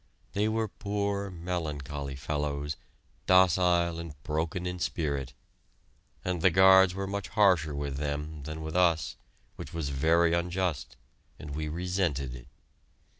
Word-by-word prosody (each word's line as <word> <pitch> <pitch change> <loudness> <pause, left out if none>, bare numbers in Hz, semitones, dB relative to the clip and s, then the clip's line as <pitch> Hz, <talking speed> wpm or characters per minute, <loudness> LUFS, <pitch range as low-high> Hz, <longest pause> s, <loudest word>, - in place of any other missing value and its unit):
They 105 +2 +1
were 110 0 0
poor, 100 -1 -2
melancholy 75 -6 -4
fellows, 75 0 -2 0.5
docile 90 -2 +4
and 85 -3 -7
broken 80 +3 -2
in 90 0 -3
spirit, 70 -7 -2 0.9
and 90 -2 -1
the 95 - +6
guards 95 +1 +6
were 100 0 -2
much 100 0 -4
harsher 90 -9 +3
with 70 -1 -3
them 75 +1 -3
than 80 +2 -6
with 80 +1 -5
us, 85 -6 +2 0.4
which - - -8
was 80 -4 -2
very 85 +5 +3
unjust, 85 -2 -1 0.4
and 75 -2 -8
we 75 +1 -3
resented 85 -6 -1
it. - - -10
85 Hz, 130 wpm, -29 LUFS, 75-90 Hz, 0.9 s, the